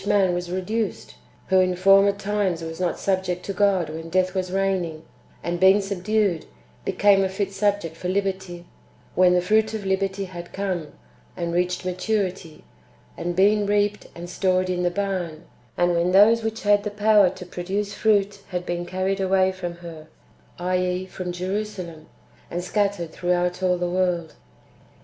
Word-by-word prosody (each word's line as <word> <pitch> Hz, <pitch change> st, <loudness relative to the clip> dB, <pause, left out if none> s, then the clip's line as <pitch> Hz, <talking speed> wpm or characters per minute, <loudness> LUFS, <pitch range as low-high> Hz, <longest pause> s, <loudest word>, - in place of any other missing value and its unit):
an 195 Hz, -3 st, +3 dB
was 175 Hz, 0 st, -3 dB
reduced, 195 Hz, +4 st, -3 dB, 0.4 s
who 190 Hz, 0 st, +5 dB
in 185 Hz, -1 st, +2 dB
former 195 Hz, +2 st, +6 dB
times 200 Hz, -4 st, -1 dB
was 160 Hz, +1 st, -6 dB
not 180 Hz, -1 st, 0 dB
subject 185 Hz, -2 st, -1 dB
to 195 Hz, -, -3 dB
God 195 Hz, -3 st, +2 dB
when 160 Hz, +2 st, -7 dB
death 185 Hz, +1 st, +1 dB
w^as 185 Hz, -1 st, -2 dB
reigning, 185 Hz, -5 st, -1 dB, 0.4 s
and 175 Hz, 0 st, -2 dB
being 190 Hz, +2 st, +6 dB
subdued, 200 Hz, -2 st, 0 dB, 0.4 s
became 195 Hz, +1 st, +4 dB
a 190 Hz, -, 0 dB
fit 195 Hz, +1 st, -2 dB
subject 200 Hz, -4 st, 0 dB
for 180 Hz, +2 st, -4 dB
liberty), 190 Hz, -2 st, -2 dB, 0.5 s
wdien 180 Hz, 0 st, +5 dB
the 180 Hz, -, +3 dB
fruit 215 Hz, +3 st, +2 dB
of 210 Hz, -2 st, -5 dB
liberty 190 Hz, 0 st, -1 dB
had 175 Hz, -2 st, -9 dB
come, 185 Hz, -5 st, -2 dB, 0.5 s
and 170 Hz, -1 st, -2 dB
reached 180 Hz, +1 st, 0 dB
maturity, 185 Hz, -3 st, -2 dB, 0.5 s
and 175 Hz, 0 st, -3 dB
been 205 Hz, +2 st, +3 dB
reaped 205 Hz, 0 st, +1 dB
and 175 Hz, +1 st, -7 dB
stored 185 Hz, 0 st, +1 dB
in 180 Hz, 0 st, -1 dB
the 175 Hz, -, +2 dB
barn, 180 Hz, -4 st, -3 dB, 0.3 s
and 175 Hz, 0 st, +3 dB
when 170 Hz, +1 st, +1 dB
those 220 Hz, +4 st, +6 dB
which 220 Hz, 0 st, -3 dB
had 205 Hz, 0 st, +4 dB
the 210 Hz, -, -2 dB
power 210 Hz, -2 st, +4 dB
to 180 Hz, 0 st, -9 dB
produce 195 Hz, +3 st, -3 dB
fruit 205 Hz, -2 st, +1 dB
had 180 Hz, -1 st, -4 dB
been 175 Hz, 0 st, -3 dB
carried 190 Hz, +2 st, -1 dB
away 190 Hz, 0 st, +3 dB
from 185 Hz, -2 st, -5 dB
her 165 Hz, -2 st, -10 dB, 0.5 s
[i.e. 180 Hz, +1 st, -1 dB
from 185 Hz, -1 st, -5 dB
Jerusalem], 180 Hz, -3 st, -4 dB, 0.4 s
and 175 Hz, +1 st, -3 dB
scattered 200 Hz, -3 st, -1 dB
throughout 180 Hz, +1 st, -1 dB
all 180 Hz, -1 st, +2 dB
the 175 Hz, 0 st, -1 dB
world. 175 Hz, -3 st, 0 dB
185 Hz, 165 wpm, -24 LUFS, 175-200 Hz, 0.5 s, former